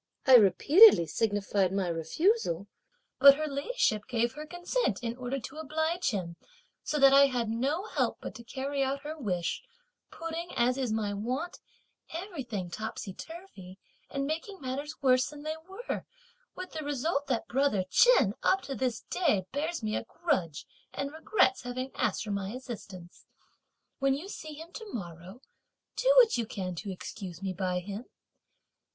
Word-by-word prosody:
I 265 - +6
repeatedly 250 - +7
signified 205 -1 0
my 195 -1 0
refusal, 175 - 0 0.5
but 275 +1 +10
her 310 +2 -2
ladyship 280 - 0
gave 235 -1 0
her 300 +2 -8
consent 350 - -1
in 230 0 -2
order 255 +2 -3
to 270 +7 -9
oblige 315 +3 -1
him, 180 -7 -4 0.5
so 300 - -1
that 275 -1 +7
I 280 0 +8
had 245 -4 -1
no 275 - -1
help - - -1
but - - -7
to 235 - -10
carry 275 +3 -3
out 270 +1 0
her 305 +2 -6
wish; 185 - -2 0.5
putting, 330 +1 -5
as 245 +1 +3
is 255 -4 -1
my 215 -2 -1
wont, 255 - -3 0.5
everything 265 - -5
topsy 215 -1 -5
turvey, 205 - -10 0.3
and 275 0 -2
making 330 +7 -4
matters 280 +3 -4
worse 255 -1 +4
than 295 -1 -10
they 310 +1 -3
were; 395 +6 -5 0.5
with 370 0 -7
the 315 -1 -5
result 290 0 -1
that 250 -4 -1
brother 260 -7 +1
Chen 265 - +5
up 385 +1 +2
to 275 - -5
this 255 -4 -1
day 215 - 0
bears 310 +1 -2
me 215 0 -1
a - - -2
grudge 230 - -2 0.3
and 280 +1 -4
regrets 320 -4 +2
having 255 +1 -4
asked - - 0
for 210 - -5
my 200 -1 -2
assistance. 205 -8 -9 0.7
When 275 -1 +2
you 330 +8 -7
see 310 -6 -7
him 325 +3 -10
to 445 - -8
morrow, 180 +3 -8 0.5
do - - +3
what 460 - +6
you 230 - -1
can 185 -6 -4
to 200 +3 -5
excuse 185 -1 -8
me 190 -1 -2
by 180 -1 -1
him. 205 +5 -7
260 Hz, 165 wpm, -30 LUFS, 205-310 Hz, 0.7 s, but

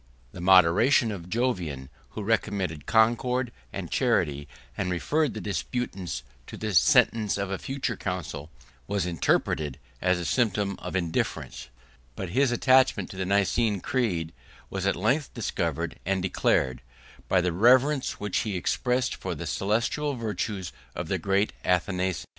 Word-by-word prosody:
3 - - -12
The - - -6
moderation 95 +7 +5
of 90 -4 -7
Jovian, 90 - -1 0.3
who 105 - -3
recommended 100 -7 -1
concord 120 +3 +2 0.2
and - - -6
charity, 70 0 +1 0.3
and 90 - -2
referred 145 - 0
the - - -3
disputants 95 - -3 0.2
to - - -8
the 110 -1 -3
sentence 115 - +4
of 100 -1 -3
a 95 - -2
future 135 -3 -3
council, 90 -6 -5 0.4
was 100 -3 0
interpreted 75 -4 0 0.2
as 90 0 +2
a 90 - -4
symptom 105 -2 +1
of - - -6
indifference: 80 -7 -2 0.5
but 95 - -5
his 130 +6 +2
attachment 130 +2 +3
to - - -9
the 95 -1 -3
Nicene 100 +2 +2
creed 90 -10 -1 0.4
was 95 0 -2
at - - +2
length 130 - 0
discovered - - -2
and 95 0 0
declared, 65 -7 +1 0.5
by 95 - +3
the 90 -1 0
reverence 130 - +4
which 105 -2 -1
he 105 -4 -2
expressed 125 +7 0
for - - -4
the - - -6
celestial 120 +8 0
4 - - -9
virtues 100 -3 -3 0.2
of - - -4
the - - 0
great 100 +1 +1
Athanasius. 90 0 0
100 Hz, 150 wpm, -27 LUFS, 90-120 Hz, 0.5 s, moderation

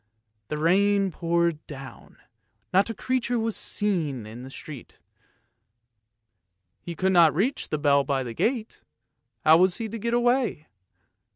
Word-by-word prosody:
The 150 - -4
rain 195 +4 +2
poured 170 -1 0
down, 135 -2 -11 0.6
not 195 +4 +3
a - - -2
creature 245 +1 -1
was 225 -1 -1
to - - -1 0.3
be 210 - +3
seen 145 - -3
in 110 +3 -10
the 130 - -9
street. 140 -2 -11 1.8
He 170 - -7
could 190 +3 +1
not 170 -4 +5
reach 235 - -1
the 155 - -1
bell 140 -1 +3
by 135 -1 -1
the 120 -2 -6
gate; 225 - -2 0.6
how 160 +1 +7
was 180 0 +3
he 225 - -4
to 230 +2 -6
get 235 +2 -1
away. 240 - +1
175 Hz, 155 wpm, -25 LUFS, 150-220 Hz, 1.8 s, how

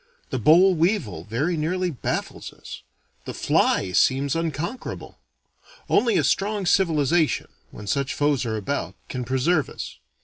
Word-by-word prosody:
The - - -1
boll 180 +5 +6
weevil 155 - 0
very 140 - -1
nearly 180 +3 -1
baffles 135 - -4
us. - - -11 0.4
The - - -6
fly 95 - +1
seems 135 - +2
unconquerable. 165 - -4 0.7
Only 230 +1 +3
a - - +2
strong 205 0 0
civilization, 165 -4 +2 0.2
when 105 - -10
such 140 +5 -1
foes 145 -2 +1
are 110 -2 -2
about, 140 +8 -3
can 125 -1 -4
preserve 135 +5 +1
us. - - -8
155 Hz, 135 wpm, -24 LUFS, 130-180 Hz, 0.7 s, boll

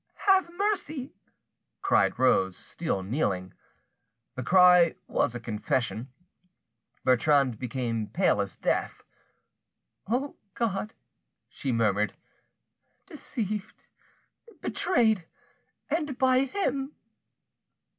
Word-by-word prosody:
"Have 380 -3 +4
mercy!" 320 -10 -2 0.7
cried - - +3
Rose, 95 -7 +3
still 160 - -3
kneeling. 95 - -2 0.8
The 130 - -5
cry 180 +3 +6
was 125 - 0
a - - -3
confession. 115 +2 -2 0.9
Bertrande 130 -2 +3
became 115 -3 -2
pate 180 - +2
as 100 -1 -2
death. - - -1 1.0
"O 255 +6 -1 0.2
God!" 215 -2 -2 0.5
she 135 - -3
murmured, 105 -3 +1 0.9
"deceived, 210 -3 -5 0.7
betrayed—and 270 - -2
by 260 0 +3
him!" 275 -4 -2
170 Hz, 80 wpm, -28 LUFS, -, 1.0 s, cry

